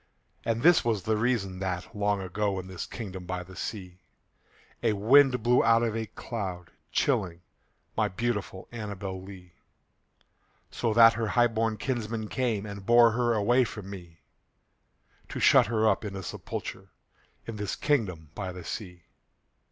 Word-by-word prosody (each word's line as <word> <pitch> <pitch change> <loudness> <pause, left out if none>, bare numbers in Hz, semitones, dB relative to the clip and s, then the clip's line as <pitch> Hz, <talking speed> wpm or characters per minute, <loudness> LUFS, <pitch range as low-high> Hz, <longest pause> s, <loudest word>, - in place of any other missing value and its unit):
And 115 0 -1
this 175 0 +6
was 110 -5 0
the 110 - +1
reason 105 -5 0
that, 95 +2 -4
long 105 -1 0
ago, 100 +2 -1
In 95 - -7
this 95 -1 -6
kingdom 95 -6 -7
by 90 -1 -3
the 95 +1 -13
sea, 90 -2 -6 0.8
A 110 - +2
wind 125 +4 +5
blew 120 +1 +4
out 115 0 +4
of 115 -2 -1
a 110 -1 -3
cloud, 95 -6 -6 0.2
chilling 85 -1 0 0.5
My - - +2
beautiful 105 -2 -3
ANNABEL 100 -4 -5
LEE; 95 -2 -12 1.2
So 115 - -1
that 115 0 +8
her 115 -1 -2
highborn 115 -2 +2
kinsmen 115 -4 -3
came 115 -6 -1
And 100 -1 -7
bore 120 +2 +6
her 120 +1 +1
away 120 +5 +3
from 105 -4 -7
me, 85 -4 -11 1.1
To - - -5
shut - - +6
her 110 -1 +2
up 100 0 +2
in 100 -2 -5
a 95 - -5
sepulchre - - -6 0.6
In 115 -2 -6
this 105 -1 -3
kingdom 95 - -1
by 95 -1 -4
the 90 -1 -9
sea. 90 -4 -7
105 Hz, 155 wpm, -28 LUFS, 95-115 Hz, 1.2 s, that